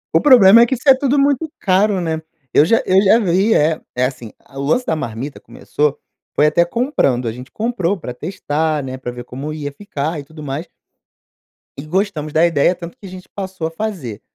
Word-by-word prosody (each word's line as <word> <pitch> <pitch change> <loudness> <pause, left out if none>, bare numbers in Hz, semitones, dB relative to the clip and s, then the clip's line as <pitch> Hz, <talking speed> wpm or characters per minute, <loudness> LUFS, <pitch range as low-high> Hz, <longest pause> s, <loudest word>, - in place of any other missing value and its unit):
O - - +5
problema 235 -6 +8
é - - +7
que 260 - 0
isso 260 +4 -11
é 270 - +10
tudo, 275 +1 0
muito 285 +3 +1
caro, 195 +1 +2
né? 160 -2 -2 0.3
Eu - - +6
já 230 +7 +2
eu 190 +1 +4
já 205 +3 +5
vi, 195 +1 +2
é 155 +1 +2
é 125 +1 +2
assim: 120 -5 -6
a 135 - -12
o - - -2
lance 245 - +1
da 160 - 0
marmita 130 0 -5
começou, 150 -1 -2 0.4
foi 150 - +4
até 150 +3 +4
comprando. 170 - 0
A 115 - -1
gente 125 +3 -11
comprou 215 -5 -1
para 125 -8 -7
testar, 155 0 -2
né, 130 -1 -5
pra 130 -2 -6
ver 120 0 -8
como 135 +5 -7
ia 150 -2 -5
ficar 160 -4 -4
e 145 - -7
tudo 150 +1 -12
mais. 145 +5 -5 1.1
E 140 - -6
gostamos 155 -2 -2
da 160 +3 +4
ideia, 165 +1 +2
tanto 175 +6 -10
que 215 - -14
a - - -9
gente 185 0 -11
passou 190 -4 -4
a - - -8
fazer. 165 - -5
165 Hz, 215 wpm, -18 LUFS, 145-205 Hz, 1.1 s, é